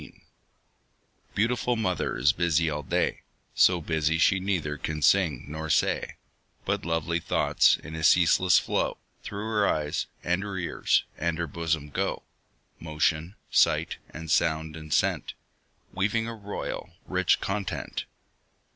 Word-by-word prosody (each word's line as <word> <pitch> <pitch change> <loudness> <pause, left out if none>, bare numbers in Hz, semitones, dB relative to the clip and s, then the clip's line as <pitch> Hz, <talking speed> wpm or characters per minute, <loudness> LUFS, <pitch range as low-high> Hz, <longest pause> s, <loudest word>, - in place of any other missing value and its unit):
_ - - -14 1.1
Beautiful 120 +3 +1
mother 100 -6 -1
is 70 +3 +4
busy 85 -1 +1
all 75 0 -3
day, 65 - -1 0.3
So 90 -1 +4
busy 80 0 0
she 95 +3 +4
neither 90 -6 -1
can 75 0 -4
sing 75 -6 +3
nor 80 +1 -5
say; - - +1 0.5
But - - -1
lovely 80 +1 0
thoughts, - - +3
in 80 - -10
a 80 0 -5
ceaseless 90 +2 +5
flow, - - 0 0.2
Through 105 +1 -6
her 105 -2 +1
eyes, 75 -1 -1 0.2
and 90 +2 0
her 100 -2 -5
ears, 85 - +1 0.2
and 85 -1 -1
her 85 - -1
bosom 80 -2 -2
go - - -2 0.6
Motion, 80 +3 -1 0.2
sight, - - +3
and 80 -1 -7
sound, 80 -1 +1
and 80 -1 -10
scent, - - +1 0.6
Weaving 105 +4 0
a 115 - -4
royal, 105 -2 -6
rich - - +2
content. 100 0 -3
85 Hz, 140 wpm, -27 LUFS, 80-95 Hz, 1.1 s, ceaseless